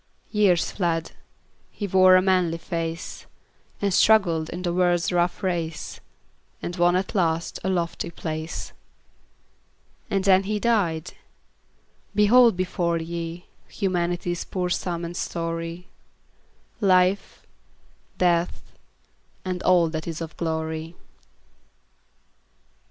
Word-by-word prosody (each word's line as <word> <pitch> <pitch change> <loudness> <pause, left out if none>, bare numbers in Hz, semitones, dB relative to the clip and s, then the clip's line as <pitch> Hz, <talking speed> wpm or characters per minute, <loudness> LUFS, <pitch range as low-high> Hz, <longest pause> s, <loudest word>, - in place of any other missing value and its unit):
Years 200 -6 +3
fled; 165 -4 -1 0.6
he 205 - -5
wore 185 -1 +6
a 185 - +5
manly 180 -3 +2
face, 165 0 -5 0.5
And 200 -2 0
struggled 175 -7 +4
in 180 - -6
the 175 -1 -1
world's 175 -1 +2
rough 175 +1 0
race, 170 -4 -3 0.6
And 175 - -5
won 175 0 +3
at 185 +1 -1
last 170 -3 0
a 190 - 0
lofty 170 -3 -2
place. 160 -1 -5 1.4
And 195 -1 0
then 190 0 +4
he 210 +1 -1
died! 185 -9 0 1.0
Behold 225 0 +6
before 175 -2 0
ye 170 +1 -5 0.2
Humanity's 175 -2 -1
poor 180 -2 -3
sum 175 -1 -2
and 170 +1 -6
story; 165 +1 -4 0.9
Life, 185 -1 +2 0.7
Death, 175 -1 0 0.7
and 185 -1 -3
all 180 -2 +4
that 160 +1 -5
is 165 -2 -4
of 165 -2 -6
glory. 160 0 -3
175 Hz, 105 wpm, -24 LUFS, 165-185 Hz, 1.4 s, wore